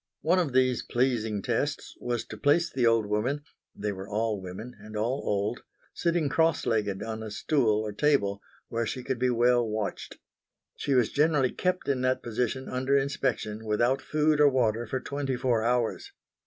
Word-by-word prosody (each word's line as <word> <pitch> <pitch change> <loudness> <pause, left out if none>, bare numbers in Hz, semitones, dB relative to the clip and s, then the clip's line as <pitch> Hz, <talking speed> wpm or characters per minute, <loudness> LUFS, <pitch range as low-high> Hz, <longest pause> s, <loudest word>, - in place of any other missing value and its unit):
One 175 +4 +3
of 165 -6 0
these 130 -1 +3
pleasing 115 -5 0
"tests" - - -2
was 120 -2 -2
to - - -8
place 145 +9 +2
the 125 -3 +2
old 115 -2 +3
woman 115 +8 -1 0.3
they 105 0 -2
were 95 0 -7
all 110 -1 -1
women 95 +7 -8
and 105 +1 -8
all 120 +6 0
old 105 +3 -1 0.3
sitting 170 -3 +1
cross 160 +2 +2
legged 105 -3 0
on 110 0 -5
a 110 - -5
stool 110 0 +1
or 110 -1 -3
table 100 -5 +1 0.3
where 115 0 -2
she 130 - -4
could 130 -1 -2
be 125 0 +2
well 120 0 +3
watched. 110 -2 -4 0.6
She 140 - 0
was 125 -4 +3
generally 145 -3 +2
kept 185 0 -1
in 135 -2 +1
that 130 0 +1
position 125 +3 -2
under 130 +2 +1
inspection, 125 -6 -1
without 120 +5 +1
food 150 0 +2
or 145 - +7
water, 120 -3 +1
for 130 +4 -2
twenty 140 -1 -3
four 120 -2 +1
hours. 120 -1 0
120 Hz, 180 wpm, -28 LUFS, 110-135 Hz, 0.6 s, or